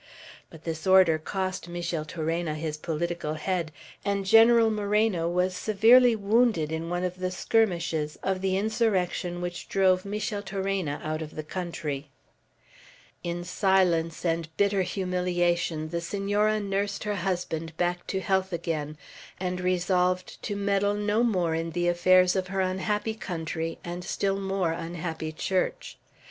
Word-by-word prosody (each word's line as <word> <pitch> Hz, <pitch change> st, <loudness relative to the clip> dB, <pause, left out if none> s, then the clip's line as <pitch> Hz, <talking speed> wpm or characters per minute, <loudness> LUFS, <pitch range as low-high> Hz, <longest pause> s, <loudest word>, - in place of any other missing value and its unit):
But 160 Hz, -, -14 dB
this 165 Hz, +2 st, -4 dB
order 185 Hz, -4 st, +6 dB
cost 185 Hz, +1 st, -3 dB
Micheltorena 165 Hz, -1 st, -2 dB
his 155 Hz, 0 st, -3 dB
political 165 Hz, 0 st, -3 dB
head, 170 Hz, 0 st, -2 dB, 0.3 s
and 200 Hz, -1 st, -1 dB
General 225 Hz, +2 st, +6 dB
Moreno 210 Hz, -4 st, +1 dB
was 180 Hz, +1 st, 0 dB
severely 230 Hz, +5 st, +5 dB
wounded 215 Hz, -6 st, +2 dB
in 160 Hz, +1 st, -3 dB
one 175 Hz, +1 st, -1 dB
of 180 Hz, 0 st, -3 dB
the 185 Hz, 0 st, -1 dB
skirmishes 170 Hz, -6 st, 0 dB
of 190 Hz, -1 st, -1 dB
the 190 Hz, 0 st, +1 dB
insurrection 195 Hz, -5 st, 0 dB
which 175 Hz, 0 st, -5 dB
drove 185 Hz, -1 st, +3 dB
Micheltorena 195 Hz, -5 st, -2 dB
out 155 Hz, +1 st, -2 dB
of 155 Hz, -1 st, -7 dB
the 155 Hz, -, -4 dB
country. 155 Hz, -4 st, -4 dB, 1.1 s
In 175 Hz, 0 st, -3 dB
silence 180 Hz, -3 st, +1 dB
and 165 Hz, -1 st, 0 dB
bitter 200 Hz, -1 st, +3 dB
humiliation 175 Hz, -4 st, 0 dB
the 170 Hz, +1 st, -2 dB
Senora 205 Hz, +4 st, 0 dB
nursed 200 Hz, 0 st, -2 dB
her 210 Hz, -1 st, -2 dB
husband 170 Hz, -3 st, -3 dB
back 175 Hz, 0 st, -1 dB
to 190 Hz, -, -2 dB
health 190 Hz, -1 st, 0 dB
again, 155 Hz, -3 st, -3 dB, 0.4 s
and 180 Hz, 0 st, -2 dB
resolved 180 Hz, 0 st, 0 dB
to 205 Hz, -, -3 dB
meddle 200 Hz, 0 st, +1 dB
no 210 Hz, +2 st, +1 dB
more 180 Hz, -8 st, +1 dB
in 165 Hz, +1 st, -2 dB
the 175 Hz, +1 st, 0 dB
affairs 180 Hz, +1 st, +4 dB
of 190 Hz, -1 st, -1 dB
her 195 Hz, +1 st, -1 dB
unhappy 210 Hz, +4 st, -1 dB
country 165 Hz, -5 st, -4 dB
and 175 Hz, +1 st, -5 dB
still 195 Hz, +2 st, -1 dB
more 195 Hz, -3 st, 0 dB
unhappy 165 Hz, -1 st, -4 dB
Church. 190 Hz, -, -2 dB
180 Hz, 140 wpm, -27 LUFS, 165-200 Hz, 1.1 s, order